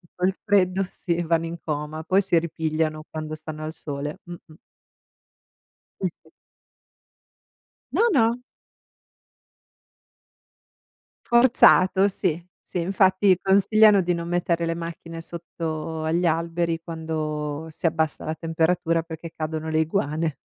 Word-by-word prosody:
col 185 Hz, +1 st, +1 dB
freddo 195 Hz, -2 st, +3 dB
sì 170 Hz, -1 st, -2 dB
vanno 165 Hz, 0 st, +1 dB
in 170 Hz, +1 st, -6 dB
coma, 155 Hz, +1 st, -4 dB
poi 185 Hz, +4 st, +3 dB
si 185 Hz, -3 st, +2 dB
ripigliano 155 Hz, -1 st, -2 dB
quando 155 Hz, 0 st, -5 dB
stanno 155 Hz, 0 st, -8 dB
al 155 Hz, +1 st, -5 dB
sole. 145 Hz, -1 st, -5 dB
Mh-mh. 175 Hz, -2 st, -11 dB, 1.5 s
Sì, -, -, +1 dB
sì. -, -, -23 dB, 1.6 s
No, -, -, +2 dB
no! 235 Hz, -, +2 dB, 2.8 s
Forzato, 205 Hz, -5 st, +5 dB
sì, 175 Hz, -3 st, -2 dB, 0.2 s
sì, 175 Hz, -, -4 dB
infatti 190 Hz, +1 st, +3 dB
consigliano 200 Hz, +1 st, +5 dB
di 175 Hz, 0 st, 0 dB
non 170 Hz, 0 st, -4 dB
mettere 170 Hz, -1 st, 0 dB
le 165 Hz, -, -1 dB
macchine 165 Hz, 0 st, -7 dB
sotto 160 Hz, -1 st, -5 dB
agli 165 Hz, +3 st, +1 dB
alberi 165 Hz, 0 st, 0 dB
quando 155 Hz, -2 st, -4 dB
si 155 Hz, -, -8 dB
abbassa 160 Hz, -1 st, 0 dB
la 155 Hz, -, -2 dB
temperatura 165 Hz, 0 st, 0 dB
perché 160 Hz, 0 st, -8 dB
cadono 155 Hz, 0 st, -4 dB
le 155 Hz, 0 st, +1 dB
iguane. 160 Hz, -2 st, -1 dB
165 Hz, 115 wpm, -24 LUFS, 155-180 Hz, 2.8 s, Forzato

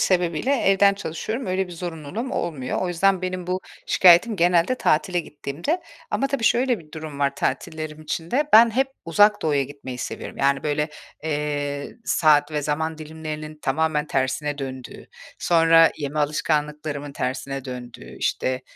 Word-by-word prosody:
sebebiyle 175 Hz, -, +1 dB
evden 200 Hz, -2 st, +4 dB
çalışıyorum, 200 Hz, -, -4 dB
öyle 185 Hz, 0 st, 0 dB
bir 180 Hz, -, -10 dB
zorunluluğum 175 Hz, -, -5 dB
olmuyor. 145 Hz, -7 st, -2 dB
O 185 Hz, -, -1 dB
yüzden 185 Hz, +2 st, +2 dB
benim 185 Hz, -1 st, -3 dB
bu 185 Hz, +1 st, -1 dB, 0.3 s
şikâyetim 185 Hz, +5 st, +6 dB
genelde 175 Hz, +5 st, +3 dB
tatile 175 Hz, -5 st, +1 dB
gittiğimde. 170 Hz, -, -4 dB, 0.3 s
Ama, 275 Hz, -, +1 dB
tabii, 275 Hz, -4 st, -2 dB
şöyle 245 Hz, +1 st, +3 dB
bir 150 Hz, -2 st, -17 dB
durum 155 Hz, -3 st, -7 dB
var 140 Hz, -1 st, +1 dB
tatillerim 155 Hz, 0 st, -3 dB
için 165 Hz, +2 st, -4 dB
de; 285 Hz, +4 st, +2 dB
ben 230 Hz, +1 st, +8 dB
hep 265 Hz, +4 st, +1 dB, 0.2 s
Uzak 205 Hz, +5 st, +4 dB
Doğu'ya 145 Hz, -3 st, +2 dB
gitmeyi 135 Hz, -2 st, -8 dB
seviyorum. -, -, -6 dB
Yani, 140 Hz, 0 st, +2 dB
böyle, 150 Hz, 0 st, 0 dB, 0.3 s
eee, 145 Hz, -2 st, -2 dB
saat 150 Hz, -2 st, +3 dB
ve 150 Hz, -1 st, -1 dB
zaman 160 Hz, +2 st, -2 dB
dilimlerinin 155 Hz, 0 st, -7 dB
tamamen 155 Hz, -1 st, 0 dB
tersine 145 Hz, +2 st, -1 dB
döndüğü, 130 Hz, -2 st, -7 dB, 0.3 s
sonra 165 Hz, -1 st, +5 dB
yeme 145 Hz, +1 st, -3 dB
alışkanlıklarımın 150 Hz, -1 st, -1 dB
tersine 135 Hz, +1 st, -3 dB
döndüğü, 125 Hz, -2 st, -9 dB
işte, 130 Hz, 0 st, -1 dB
155 Hz, 145 wpm, -23 LUFS, 145-185 Hz, 0.3 s, ben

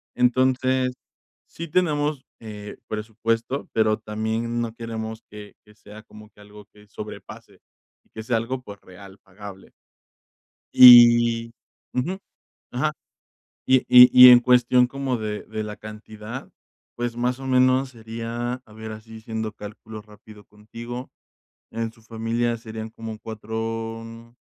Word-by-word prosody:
entonces, 130 Hz, +1 st, +1 dB, 0.5 s
sí 170 Hz, 0 st, -8 dB
tenemos, 150 Hz, -4 st, 0 dB, 0.2 s
eh, 105 Hz, -2 st, -10 dB
presupuesto, 115 Hz, +4 st, -3 dB
pero 110 Hz, -1 st, +2 dB
también 110 Hz, +2 st, -3 dB
no 115 Hz, -1 st, -5 dB
queremos 110 Hz, -1 st, -7 dB
que 105 Hz, -1 st, -12 dB
que 105 Hz, -, -20 dB
sea 105 Hz, 0 st, -14 dB
como 105 Hz, 0 st, -15 dB
que 105 Hz, -, -27 dB
algo 105 Hz, 0 st, -15 dB
que 105 Hz, 0 st, -19 dB
sobrepase 105 Hz, +1 st, -11 dB, 0.4 s
y -, -, -35 dB
que 110 Hz, -, -9 dB
sea 115 Hz, +1 st, 0 dB
algo, 125 Hz, +3 st, -4 dB
pues, 100 Hz, -4 st, -12 dB
real, 95 Hz, +1 st, -15 dB
pagable. 100 Hz, 0 st, -13 dB, 1.0 s
Y 120 Hz, -1 st, +7 dB, 0.4 s
ujú, 170 Hz, +10 st, -2 dB, 0.5 s
ajá, 150 Hz, +5 st, -1 dB, 0.7 s
y 130 Hz, 0 st, +5 dB
y 125 Hz, 0 st, +9 dB, 0.2 s
y -, -, +11 dB
en 120 Hz, -, +8 dB
cuestión 125 Hz, 0 st, +3 dB
como 135 Hz, -2 st, -3 dB
de 105 Hz, -1 st, -5 dB
de 110 Hz, 0 st, -5 dB
la 105 Hz, 0 st, -7 dB
cantidad, 110 Hz, +3 st, -10 dB, 0.5 s
pues, 120 Hz, -1 st, -4 dB
más 125 Hz, +2 st, -1 dB
o 135 Hz, -, -8 dB
menos 130 Hz, +1 st, +2 dB
sería, 115 Hz, +1 st, -6 dB
a 110 Hz, -, -18 dB
ver, 110 Hz, 0 st, -9 dB
así 110 Hz, +1 st, -11 dB
haciendo 110 Hz, -1 st, -5 dB
cálculos 105 Hz, +1 st, -11 dB
rápido 105 Hz, 0 st, -17 dB
contigo, 115 Hz, +4 st, -9 dB, 0.6 s
en 115 Hz, 0 st, -4 dB
su 115 Hz, 0 st, -24 dB
familia 115 Hz, +1 st, -2 dB
serían 110 Hz, -1 st, -8 dB
como 110 Hz, -1 st, -8 dB
4 115 Hz, +1 st, -7 dB
115 Hz, 135 wpm, -23 LUFS, 110-125 Hz, 1.0 s, y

